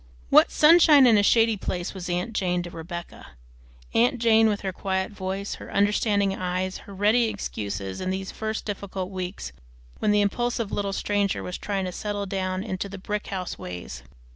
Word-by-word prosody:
What - - +7
sunshine 305 -3 +7
in 235 -3 +6
a 205 - +5
shady 225 +2 +4
place 180 -1 -4
was 185 -2 -6
aunt 180 +6 -2
Jane 180 -4 0
to 175 - -8
Rebecca! 170 - -8 0.6
Aunt 245 +3 +3
Jane 225 -1 +4
with 205 -1 -1
her 190 -2 -3
quiet 190 +1 -2
voice, 195 0 -4
her - - -9
understanding 205 0 +2
eyes, 185 0 -2
her - - -8
ready 215 +5 +3
excuses, 100 - -4
in 185 - -2
these 190 0 -3
first 220 0 -4
difficult 195 -2 -5
weeks, 180 - -5 0.5
when - - +1
the 210 0 +4
impulsive 230 +1 -1
little 200 -1 -1
stranger 200 0 0
was 180 - -5
trying 195 -2 -2
to 180 - -3
settle 205 +2 -3
down 185 -1 -2
into 200 -2 -4
the 200 - -7
"brick 210 +2 -4
house 185 -2 -5
ways." 90 -9 -7
195 Hz, 180 wpm, -25 LUFS, 185-210 Hz, 0.6 s, What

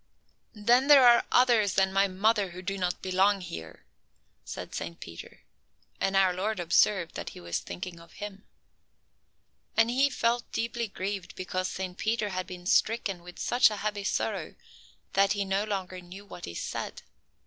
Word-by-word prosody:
"Then 240 +6 +3
there 285 -3 +8
are 235 0 +6
others 235 -6 +4
than 190 0 +3
my 195 +1 +4
mother 200 +1 +1
who 180 +1 -9
do 195 +1 -2
not 180 -2 -2
belong 190 +2 +3
here," 80 - -9 0.6
said - - -7
Saint 85 0 -5
Peter, 85 0 -10 0.6
and 195 - 0
our 190 -1 +4
Lord 205 +3 -2
observed 175 +1 +2
that - - -5
he - - -8
was 85 -1 -3
thinking 170 - -7
of 165 0 -16
Him. 205 -1 -8 1.3
And 225 +1 +4
He 270 +3 +3
felt 240 -2 0
deeply 235 0 -2
grieved 195 -1 -5
because 185 0 -2
Saint 185 -1 -5
Peter 220 -1 0
had 185 -1 -3
been 180 -1 -9
stricken 200 -2 +1
with 180 0 -12
such 245 -1 +4
a 210 - -4
heavy 205 -1 -2
sorrow - - -2 0.6
that 195 0 +4
he 200 -1 -1
no 195 +2 0
longer 185 -3 -4
knew 185 +3 -11
what 180 - -9
he 85 - -8
said. - - -5
195 Hz, 170 wpm, -28 LUFS, 180-215 Hz, 1.3 s, there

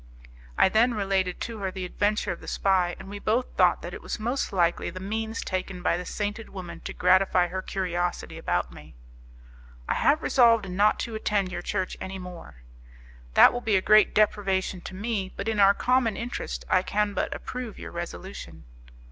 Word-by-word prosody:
I - - +6
then 225 +5 +3
related 195 -3 0
to 230 -2 -5
her 195 -1 -2
the 185 0 -5
adventure 205 +3 0
of 175 - -6
the - - -12
spy, 185 -3 +1
and - - -11
we 205 +1 -7
both 230 +5 -1
thought - - +3
that - - -6
it - - -7
was - - -5
most 240 +5 -1
likely 175 -3 +1
the 185 +2 -8
means 220 +3 -3
taken 185 -1 -4
by - - +2
the 180 0 -5
sainted 210 +1 -4
woman 185 -3 -8
to - - -4
gratify 180 -1 +3
her 185 +1 -3
curiosity 175 -2 -3
about - - -1
me. - - -13 0.9
"I - - +1
have 305 +2 +2
resolved 230 -5 +4
not 200 +3 +2
to 230 - -4
attend 205 -3 0
your 175 0 -4
church 185 0 -3
any 190 0 -5
more." 170 - -10 0.7
"That - - +8
will 245 - -3
be 220 -4 +1
a 190 - +3
great 215 +1 +5
deprivation 195 -3 +1
to 190 - -7
me, 200 -2 -2
but 200 - -4
in 220 -2 0
our 200 0 +6
common 245 -3 +1
interest 240 +1 -5
I 185 - +3
can 205 +2 0
but - - -1
approve 250 -4 -6
your - - -8
resolution." 170 - -7
195 Hz, 190 wpm, -26 LUFS, 185-215 Hz, 0.9 s, That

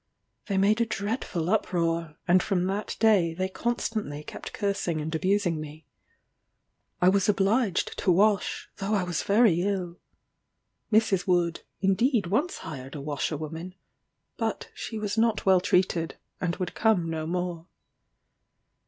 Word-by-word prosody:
They 200 -3 0
made 210 +4 +3
a - - +3
dreadful 200 -6 -2
uproar, 165 -6 0
and 180 +1 +5
from 180 -3 0
that 200 +3 -3
day 195 -7 +4
they 185 +2 -1
constantly 215 -7 -3
kept - - -8
cursing 200 -6 -1
and 155 +2 -4
abusing 180 -1 +1
me. 155 0 -10 1.1
I 180 - +4
was 195 +1 +2
obliged 200 0 +1
to 185 - +3
wash, 200 +3 +2
though 200 +2 -1
I 195 - +1
was 175 -3 -2
very 200 -5 +4
ill. 185 -3 -2 0.9
Mrs. 205 -4 +3
Wood, 175 -2 +1 0.2
indeed 205 +3 +2
once 240 - 0
hired 135 -3 -7
a - - -5
washerwoman, 155 +4 -4 0.6
but - - -3
she 225 - -6
was 210 +1 -2
not 225 -2 +2
well 190 -2 +5
treated, 180 -3 +1 0.2
and 180 -2 -1
would 180 -1 -4
come 215 -7 +2
no 160 -1 -3
more. 175 -1 -3
185 Hz, 140 wpm, -27 LUFS, 165-205 Hz, 1.1 s, and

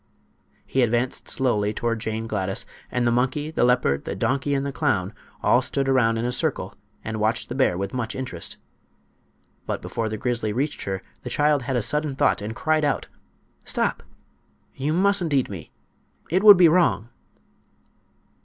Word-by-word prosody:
He 135 - 0
advanced 120 +1 0
slowly 105 -6 0
toward 115 -1 -1
Jane 110 +1 -3
Gladys, 105 0 -2 0.2
and 125 -1 0
the 120 - +3
monkey, 130 +5 0
the 160 - +1
leopard, 120 - +2
the - - -4
donkey 140 +2 0
and 135 0 -1
the 140 - -2
clown 110 - 0 0.3
all - - +4
stood 135 -1 -2
around 120 -4 +3
in 115 - -1
a 125 - 0
circle 125 - -1 0.3
and 110 0 -4
watched 110 +2 0
the - - -3
bear 130 -10 +2
with 100 +1 -3
much 125 -3 -3
interest. 125 -11 -5 1.1
But - - -2
before 115 -1 -3
the 110 - -4
grizzly 115 -2 -1
reached 140 +5 -2
her 95 -1 -3 0.2
the - - -6
child 150 -1 +2
had 130 +1 -2
a 120 - +1
sudden 150 +2 0
thought, - - +2
and 110 +2 -5
cried 155 +2 +1
out: 145 - 0 0.5
"Stop! - - -1 0.7
You 140 +3 -2
mustn't 180 -3 +2
eat 130 -6 +1
me. 85 -7 -8 0.6
It 185 +3 +3
would 205 -2 +10
be 175 -2 +7
wrong." 160 - +2
125 Hz, 170 wpm, -24 LUFS, 110-145 Hz, 1.1 s, would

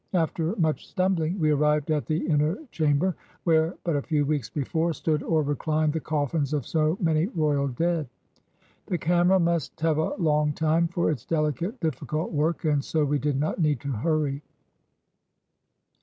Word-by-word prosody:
After 165 +2 0
much 160 -6 0
stumbling 185 -1 0
we 155 -2 +3
arrived 150 0 +2
at 150 -2 0
the 155 +1 -1
inner 155 +3 +1
chamber 155 +4 +1 0.3
where, 160 0 +2
but 170 -3 0
a 145 - +1
few 150 -1 0
weeks 140 -6 -1
before, 160 +4 -1
stood 155 0 -1
or 160 0 +1
reclined 155 +2 0
the 160 - -1
coffins 150 -1 -1
of 145 -5 -1
so 155 +2 +1
many 165 -1 +2
royal 150 - 0
dead. 160 +2 -1 0.8
The 180 - 0
camera 175 +3 +3
must 170 -3 -1
have 160 -1 +2
a 160 - 0
long 150 -5 +1
time 160 +2 +2
for 170 -1 0
its 130 -7 -4
dehcate, 160 - -1
difficult 155 0 -2
work, 160 +2 0
and 145 -2 +2
so 155 0 0
we 145 0 0
did 140 -1 0
not 155 +5 -1
need 150 -5 +2
to 140 -1 -4
hurry. 145 +3 0
155 Hz, 170 wpm, -26 LUFS, 150-165 Hz, 0.8 s, we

